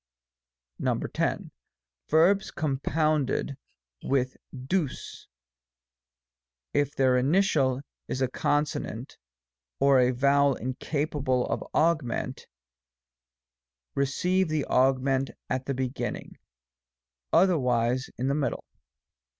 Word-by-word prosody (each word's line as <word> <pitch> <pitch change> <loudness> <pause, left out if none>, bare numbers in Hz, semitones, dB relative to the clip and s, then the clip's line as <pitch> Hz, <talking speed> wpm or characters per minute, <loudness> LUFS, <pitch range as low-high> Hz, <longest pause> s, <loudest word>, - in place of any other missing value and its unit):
X. - - 0 0.7
Verbs 180 +6 +4
compounded 150 -1 0 0.5
with 130 -1 0 0.2
8vg^ 135 +3 -3 1.5
if 145 -1 +1
their 130 -1 +3
initial 140 -3 +2 0.3
is 130 - -3
a 130 - +2
consonant, 145 -3 -2 0.6
or 140 -1 +5
a 125 0 +4
vowel 140 +2 +3
incapable 130 0 -1
of - - -2
augment, 155 -7 0 1.5
receive 180 +7 +1
the 155 -2 0
augment 135 +1 +2 0.2
at 130 0 -2
the 140 - -1
beginning, 130 0 -4 0.9
otherwise 125 -8 +2
in 130 - -1
the 140 - +2
mid 140 -5 0
dle. - - -10
135 Hz, 85 wpm, -27 LUFS, 130-155 Hz, 1.5 s, or